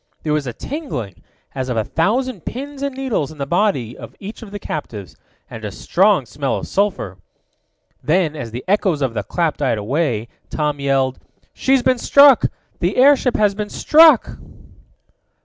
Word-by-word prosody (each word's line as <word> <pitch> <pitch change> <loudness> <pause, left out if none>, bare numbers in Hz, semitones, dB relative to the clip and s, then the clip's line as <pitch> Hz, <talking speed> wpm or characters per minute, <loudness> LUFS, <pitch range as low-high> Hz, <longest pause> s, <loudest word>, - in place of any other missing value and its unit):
There 150 - 0
was 150 -3 -1
a 120 - -4
tingling, 190 - -6 0.3
as 130 -1 -4
of 125 - -2
a 110 - +1
thousand 215 - -1
pins 275 +2 -6
and 280 -2 -3
needles 235 - -2
in 155 - -13
the 140 - -3
body 155 - 0
of - - -11
each 205 +4 -9
of 225 - -9
the 205 - -6
captives, 115 - -6 0.3
and 110 - -10
a 105 - -4
strong 190 - +2
smell 135 +2 -2
of - - -6
sulphur. 190 - -1 0.8
Then, 160 -1 +1
as 135 -6 -6
the 120 +3 -7
echoes 185 -7 +1
of 130 -4 -1
the - - -2
clap 170 -4 -1
died 130 -6 0
away, 120 0 -1 0.2
Tom 150 -2 -2
yelled: 135 -2 0 0.3
"She's 265 -1 +2
been 255 -1 +2
struck! 280 -1 +6 0.3
The 175 +3 -1
airship 260 -1 +4
has 205 -2 +3
been 210 +1 -5
struck!" 310 -5 +5
165 Hz, 170 wpm, -19 LUFS, -, 0.8 s, struck